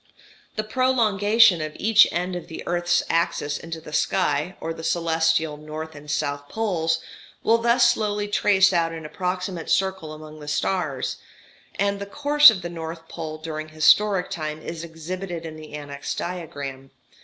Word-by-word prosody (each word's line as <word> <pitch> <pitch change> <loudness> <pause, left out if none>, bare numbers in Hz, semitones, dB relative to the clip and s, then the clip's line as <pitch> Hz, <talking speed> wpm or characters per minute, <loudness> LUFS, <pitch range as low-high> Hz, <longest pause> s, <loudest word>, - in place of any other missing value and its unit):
The 215 - -1
prolongation 220 -5 +4
of 155 0 -4
each 215 0 +5
end 180 +1 -2
of 175 - -6
the 160 - -7
earth's 175 0 +1
axis 165 -3 0
into 165 0 -7
the 155 -1 -11
sky, 170 0 0
or 165 - -4
the 160 - -9
celestial 160 -2 +1
north 155 +1 -7
and 150 0 -12
south 145 -1 -2
poles, 165 -7 0 0.4
will 230 +1 +4
thus 235 +1 +4
slowly 210 -1 -1
trace 195 -2 +4
out 165 -1 +1
an 160 -1 -7
approximate 180 0 -3
circle 190 -5 0
among 155 0 -10
the 150 - -10
stars; 150 -2 -1 0.6
and 200 0 0
the 200 - -6
course 295 +6 +7
of 195 -6 -2
the - - -3
north 165 -1 -7
pole 155 -2 -6
during 155 0 -6
historic 180 +5 +3
time 155 -1 -4
is 165 +1 -6
exhibited 170 +1 -6
in 160 -1 -7
the 155 -1 -11
annexed 145 -1 -6
diagram. 140 -7 -5
165 Hz, 160 wpm, -24 LUFS, 155-195 Hz, 0.6 s, course